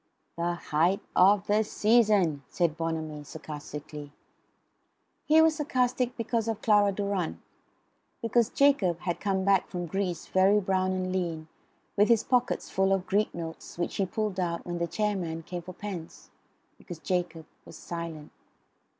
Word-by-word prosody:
"The 175 Hz, +1 st, -1 dB
height 170 Hz, +4 st, +1 dB, 0.2 s
of 200 Hz, +2 st, +5 dB
the 210 Hz, +1 st, +2 dB
season," 210 Hz, -9 st, +3 dB
said 170 Hz, -3 st, 0 dB
Bonamy 160 Hz, -2 st, -3 dB
sarcastically. 150 Hz, -1 st, -8 dB, 1.1 s
He 315 Hz, +1 st, +6 dB
was 320 Hz, -1 st, +3 dB
sarcastic 250 Hz, -4 st, 0 dB
because 230 Hz, -1 st, -1 dB
of 225 Hz, -1 st, -3 dB
Clara 205 Hz, -2 st, +4 dB
Durrant; 195 Hz, -, -2 dB, 0.8 s
because 230 Hz, 0 st, +2 dB
Jacob 235 Hz, -, +3 dB
had 175 Hz, -1 st, -2 dB
come 190 Hz, -1 st, 0 dB
back 195 Hz, -2 st, +3 dB
from 175 Hz, -1 st, -4 dB
Greece 180 Hz, -1 st, -2 dB
very 195 Hz, +2 st, +4 dB
brown 185 Hz, -1 st, 0 dB
and 185 Hz, 0 st, -2 dB
lean, 165 Hz, -4 st, -3 dB, 0.5 s
with 205 Hz, +1 st, +4 dB
his 230 Hz, -2 st, +4 dB
pockets 250 Hz, -1 st, +1 dB
full 190 Hz, 0 st, +1 dB
of 190 Hz, -1 st, +1 dB
Greek 210 Hz, +2 st, +1 dB
notes, 165 Hz, -1 st, -7 dB
which 175 Hz, -, -2 dB
he 195 Hz, -, +1 dB
pulled 210 Hz, 0 st, -2 dB
out 170 Hz, -2 st, -2 dB
when 175 Hz, -1 st, -4 dB
the 170 Hz, -, 0 dB
chair 210 Hz, +2 st, 0 dB
man 165 Hz, -3 st, -4 dB
came 175 Hz, +1 st, -6 dB
for 185 Hz, +2 st, -9 dB
pence; 180 Hz, -4 st, -8 dB, 0.5 s
because 175 Hz, -5 st, -9 dB
Jacob 170 Hz, -2 st, -2 dB, 0.2 s
was -, -, -12 dB
silent. 165 Hz, -3 st, -6 dB
185 Hz, 150 wpm, -28 LUFS, 170-210 Hz, 1.1 s, He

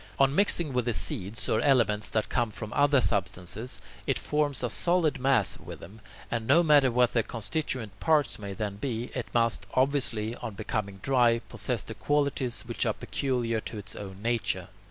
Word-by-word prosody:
On 135 Hz, 0 st, +4 dB
mixing 170 Hz, -5 st, +3 dB
with 125 Hz, -2 st, +1 dB
the 120 Hz, -3 st, 0 dB
seeds 115 Hz, -4 st, -3 dB
or -, -, +2 dB
elements 110 Hz, -7 st, +3 dB
that 110 Hz, -1 st, 0 dB
come 120 Hz, -2 st, 0 dB
from 105 Hz, 0 st, -7 dB
other 145 Hz, -1 st, +4 dB
substances, 100 Hz, +1 st, -2 dB, 0.3 s
it -, -, +2 dB
forms 150 Hz, -3 st, 0 dB
a 125 Hz, -, 0 dB
solid 175 Hz, -3 st, +1 dB
mass 130 Hz, -7 st, +2 dB
with -, -, -9 dB
them 105 Hz, +6 st, -12 dB, 0.3 s
and, 115 Hz, -1 st, -2 dB
no 165 Hz, +6 st, +6 dB
matter 145 Hz, -4 st, +5 dB
what 125 Hz, 0 st, +2 dB
the 115 Hz, -, +3 dB
constituent 115 Hz, -2 st, -4 dB
parts 150 Hz, -7 st, +2 dB
may 100 Hz, -1 st, -5 dB
then 100 Hz, 0 st, -3 dB
be, 120 Hz, 0 st, -3 dB
it 125 Hz, -, -3 dB
must, 115 Hz, -4 st, +1 dB
obviously, 130 Hz, -5 st, +1 dB
on 110 Hz, -, -6 dB
becoming 100 Hz, -1 st, -3 dB
dry, 125 Hz, -3 st, +4 dB
possess 115 Hz, 0 st, -3 dB
the 110 Hz, -, -7 dB
qualities 140 Hz, 0 st, 0 dB
which 120 Hz, -1 st, -1 dB
are 110 Hz, -, +1 dB
peculiar 120 Hz, -5 st, -1 dB
to 110 Hz, -, -7 dB
its 105 Hz, +1 st, -7 dB
own 95 Hz, 0 st, -8 dB
nature. 120 Hz, 0 st, -1 dB
120 Hz, 180 wpm, -28 LUFS, 110-135 Hz, 0.3 s, no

